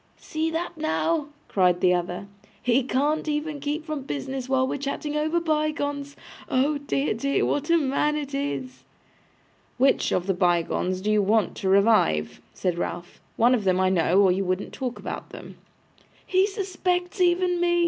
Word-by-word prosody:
'See 315 +1 -2
that 330 +2 -3
now!' 315 0 0 0.2
cried 180 -2 +2
the 180 0 +4
other. 180 +2 -2 0.3
'He 245 +2 +2
can't 290 +5 0
even 300 0 -2
keep 295 +2 -3
from 310 -3 -4
business 260 - -5
while 260 -1 +2
we're 280 - -3
chatting 285 +2 -3
over 310 +3 +1
bygones. 295 -3 -1 0.3
Oh 285 +3 +1
dear, 280 0 -1
dear, 275 +6 0
what 290 +2 -1
a 335 - +5
man 295 0 +1
it 290 -2 -4
is!' 275 -2 -4 0.9
'WHICH 265 +2 +3
of 180 - 0
the 195 - +1
bygones 180 +1 0
do 210 +2 0
you 210 -1 +4
want 210 +2 +1
to 190 - -1
revive?' 195 - +3
said 175 -2 -2
Ralph. 175 0 -5 0.2
'One 240 +2 +5
of 235 -5 +1
them, 185 -1 +2
I 185 0 +3
know, 185 +1 +3
or 190 - +5
you 190 +2 0
wouldn't 185 +1 -2
talk 250 -2 -4
about - - -6
them.' - - -11 0.7
'He 375 +1 +3
suspects 370 -2 -2
even 355 0 +2
me! 345 0 +2
275 Hz, 170 wpm, -25 LUFS, 195-310 Hz, 0.9 s, a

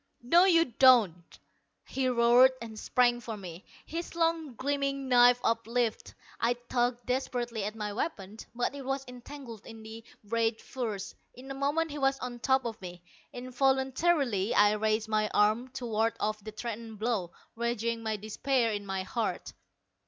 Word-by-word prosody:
"No, 340 +9 +5
you 335 -3 +5
don't!" 225 - +4 0.5
he 265 -1 -1
roared, 245 +2 +5
and 220 -2 -8
sprang 240 -1 +2
for 230 -2 -6
me, 180 -2 -9 0.2
his 335 +2 -6
long 330 -5 0
gleaming 275 +1 -2
knife 245 -1 +6
uplifted. 230 0 -1 0.2
I 235 +1 +2
tugged 245 0 -1
desperately 240 -4 -2
at 210 +1 -4
my 210 -2 -4
weapon, 210 - -4 0.2
but 245 +2 -1
it 280 -1 -7
was 270 +1 -3
entangled 250 -2 -10
in 225 -1 -11
the 220 +1 -9 0.2
ragged 225 +1 0
furs. 220 -7 -5 0.2
In 265 +2 -10
a - - -3
moment 290 +4 0
he 295 - -5
was 270 0 +2
on 245 -2 -6
top 265 +1 +2
of 225 -3 -5
me. 175 -1 -9 0.3
Involuntarily 265 - +1
I 205 0 +6
raised 215 +1 0
my 215 -1 +1
arm 215 +4 +3
to 250 - -5
ward 225 0 0
off 215 0 -2
the 215 - -7
threatened 225 0 -6
blow, 215 -5 -1 0.3
raging 235 0 -2
despair 220 +3 0
in 205 -1 -4
my 190 -1 -2
heart. 225 +4 -3
235 Hz, 160 wpm, -29 LUFS, 215-265 Hz, 0.5 s, knife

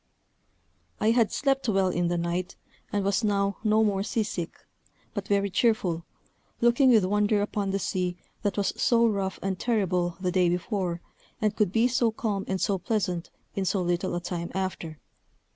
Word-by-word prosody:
I 220 - +3
had 230 -2 +3
slept 270 -3 0
well 195 -2 +3
in 175 -1 0
the 175 0 0
night, 170 +1 -2 0.4
and 205 -2 0
was 200 +3 +1
now 200 -2 +1
no 215 0 +4
more 200 -3 +1
sea 220 +2 0
sick, 175 -5 -5 0.6
but 205 -2 -4
very 200 -1 +1
cheerful, 185 -7 +1 0.5
looking 240 +3 +4
with 220 -6 +5
wonder 210 +2 +2
upon 205 -1 -1
the 195 - 0
sea 180 -2 -2 0.2
that 205 -2 -1
was 200 - +1
so 235 -1 +4
rough 195 -3 -1
and 190 -1 -2
terrible 180 -7 0
the 185 -1 -1
day 180 -1 +3
before, 175 -1 -2 0.4
and 215 -2 0
could 210 -5 +1
be 225 +4 +3
so 245 -1 +2
calm 215 -4 -2
and 190 0 -1
so 195 -1 +1
pleasant 185 -4 -1 0.2
in 195 - -1
so 190 +1 +1
little 175 0 0
a - - 0
time 175 -1 -4
after. 185 -4 -3
195 Hz, 175 wpm, -27 LUFS, 180-215 Hz, 0.6 s, with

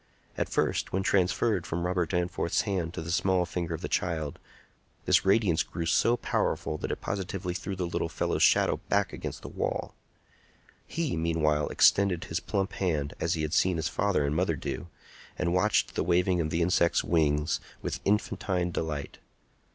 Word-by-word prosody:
At - - -2
first, - - 0
when 95 +1 0
transferred 95 -2 +1
from 85 +2 -2
Robert 90 -2 0
Danforth's 90 -1 0
hand 90 -5 -2
to 80 - -4
the 85 - -4
small 90 +1 +2
finger 85 -2 -3
of - - -9
the - - -3
child, 80 -5 -2 0.7
this - - +4
radiance 95 -4 +3
grew 85 - -4
so 115 +8 +3
powerful 75 - -1
that - - -3
it - - -4
positively 95 -2 -3
threw 95 +2 -4
the 90 -1 -2
little 85 - -2
fellow's - - -1
shadow - - +4
back 100 -2 +1
against - - -6
the - - -6
wall. - - -3 0.9
He, 165 - -2
meanwhile, 80 -2 +1
extended 95 -4 +4
his 80 - -2
plump 100 +1 -2
hand 75 -6 -1
as 80 - 0
he 80 - -2
had 75 +1 -2
seen 90 -1 +3
his 80 +1 -1
father 95 -7 +1
and 70 +1 -1
mother 85 -1 +1
do, 75 - -5 0.5
and 85 -1 0
watched 100 +4 +2
the - - 0
waving 90 0 +2
of 80 - -1
the 85 +2 +1
insect's 85 0 +2
wings 75 -2 +1 0.2
with - - -3
infantine 95 -3 0
delight. 75 -3 -4
85 Hz, 175 wpm, -28 LUFS, 80-95 Hz, 0.9 s, this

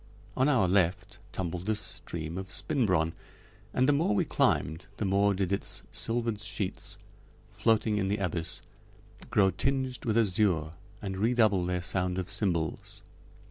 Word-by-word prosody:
On 130 +3 +3
our 120 -10 +4
left 90 -1 +1
tumbled 90 0 -4
the 110 - +2
stream 85 -5 -5
of 95 0 -7
Spinbronn, 90 - +1 0.6
and 130 +1 +2
the 145 - +5
more 140 -8 +2
we - - +2
climbed 80 +6 +1
the 105 - -1
more 100 +1 +3
did 95 -1 -1
its 100 - -2
silvered 115 -2 0
sheets, 100 -2 -4 0.5
floating 110 -2 +2
in 95 -2 0
the 100 +2 0
abyss, 90 -4 -2 0.7
grow 95 -2 +4
tinged 130 +5 -1
with 110 -1 +1
azure 95 -7 +2 0.3
and 95 -1 -4
redouble 110 -4 +3
their 90 -1 -1
sound 90 0 -1
of 90 -1 -3
cymbals. 85 -6 -2
100 Hz, 145 wpm, -29 LUFS, 90-110 Hz, 0.7 s, the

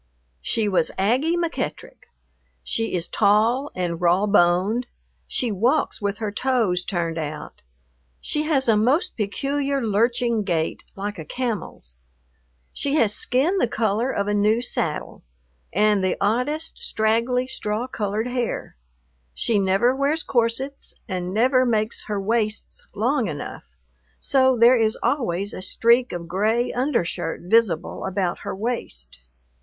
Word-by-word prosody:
She 215 - 0
was 185 -5 +1
Aggie 255 - +2
McEttrick. 475 +9 -4 0.6
She 225 -4 -1
is 175 0 -2
tall 225 +7 +2
and 175 -2 -2
raw 180 +3 +3
boned, 200 +4 +2 0.4
she 245 -3 -1
walks 240 +8 +1
with 200 0 -1
her 215 -2 -3
toes 220 -7 +1
turned 170 -4 -2
out, 150 -1 -6 0.6
she 300 - -2
has 300 -4 +1
a 225 - +5
most 250 +10 +2
peculiar 275 +6 -1
lurching 235 +1 +1
gait 170 -5 -1
like 205 -1 -5
a - - -5
camel's. 210 - -5 0.8
She 285 +1 -1
has 225 -9 +3
skin 290 - +1
the - - +2
color 225 +2 0
of 200 -6 -1
a 205 - 0
new 210 +2 +3
saddle, 170 -10 -3 0.5
and 210 +1 +2
the 185 - 0
oddest 250 +10 -1
straggly 230 +3 +1
straw 220 -2 -3
colored 215 -3 -2
hair. 245 -2 -3 0.6
She 220 -3 +2
never 195 +6 +2
wears 285 +4 0
corsets 250 +3 -1
and 180 -3 -3
never 255 +5 +3
makes 220 -2 0
her 210 -1 -2
waists 215 +1 -2
long 240 +2 +1
enough, 145 -4 -6 0.5
so 260 -2 +3
there 240 +2 +6
is 220 -1 +2
always 200 - 0
a - - -6
streak 235 +6 +2
of 170 -1 -5
gray 215 +7 0
undershirt 180 - -1
visible 190 -3 +1
about 185 -2 -1
her - - -5
waist. 190 - -5
220 Hz, 135 wpm, -23 LUFS, 195-250 Hz, 0.8 s, there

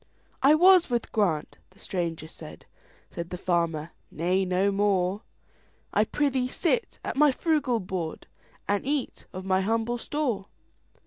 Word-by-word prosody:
"I 280 +3 +6
was 365 0 +6
with 240 -2 -1
Grant"—the 185 -1 -2
stranger 170 -5 -3
said; - - -11 0.5
Said 170 0 -6
the 180 - -5
farmer, 170 -3 -1 0.2
"Nay, 180 +4 0
no 185 +2 +2
more,—I 195 -1 -2
prithee 270 -3 0
sit 360 - -1
at - - -3
my 300 0 +6
frugal 285 -5 +1
board, 180 -4 -4 0.4
And 200 0 +1
eat 280 0 -3
of 185 +1 -7
my 190 0 +2
humble 225 +4 0
store. 240 -9 -2
200 Hz, 130 wpm, -27 LUFS, 180-265 Hz, 0.5 s, I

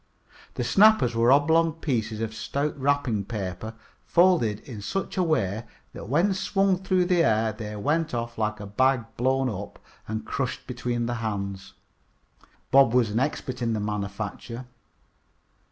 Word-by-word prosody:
The 125 - -1
snappers 195 - +5
were 115 +2 +4
oblong 160 +3 +4
pieces 115 -9 -2
of 110 -1 -3
stout 140 +6 -2
wrapping 135 -6 +1
paper, 105 0 -5 0.3
folded 170 - +3
in 115 -6 -9
such 195 - -3
a 185 - +1
way 115 - 0 0.3
that - - -9
when 170 +9 +3
swung 195 0 +1
through 185 -1 +1
the 175 -2 +3
air 110 -4 +2
they 105 -1 -6
went 155 +10 0
off 115 -1 -3
like 105 -1 -2
a 105 - -6
bag 130 +4 +1
blown 130 +2 +1
up 100 -4 -5 0.3
and 110 0 -4
crushed 130 +1 -3
between 120 -1 -2
the 120 - -2
hands. 100 -3 -4 1.0
Bob 135 -3 +6
was 120 -4 +3
an 110 - 0
expert 130 -2 -2
in 115 -1 0
their 105 -2 -2
manufacture. 105 +4 -5
120 Hz, 155 wpm, -26 LUFS, 110-145 Hz, 1.0 s, Bob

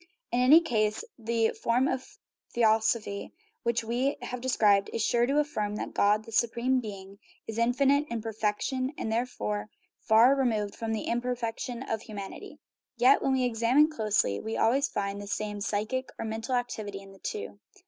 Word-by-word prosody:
In 240 - +1
any 280 +7 +7
case 215 - 0 0.2
the 230 0 +1
form 245 +3 +1
of 275 +12 -4 0.4
theosophy 220 -2 +1 0.5
we 245 +5 0
have 250 -1 -5
described 210 -6 +3
is 225 - -1
sure 240 +1 +2
to 280 +2 +1
affirm 215 -9 -1
that - - -5
God, 210 +2 +2
the 225 - -11
su 235 +2 +3
preme 250 +3 0
being, 200 -2 -9 0.3
is 225 0 -5
infinite 275 +5 +3
in 235 - -2
perfection, 225 +5 -2
and 220 - -3
therefore 220 -3 -2 0.3
far 230 +4 +5
removed 225 -7 0
from 225 -1 -3
the 220 - -2
imperfection 240 0 -3
of 225 -4 -3
humanity. 205 -4 -8 0.4
Yet, 255 +4 +5
when 270 - +1
we 260 -1 +2
examine 250 +6 +3
closely, 210 - +1
we 220 +1 -4
always 270 +6 +3
find 200 -3 -3
the 205 - -8
same 210 0 -3
psychic 220 +5 -2
or - - -4
mental 225 +3 -2
activity 215 -5 -3
in 195 - -14
the 195 - -16
two. 435 -1 -5
230 Hz, 170 wpm, -28 LUFS, 215-255 Hz, 0.5 s, any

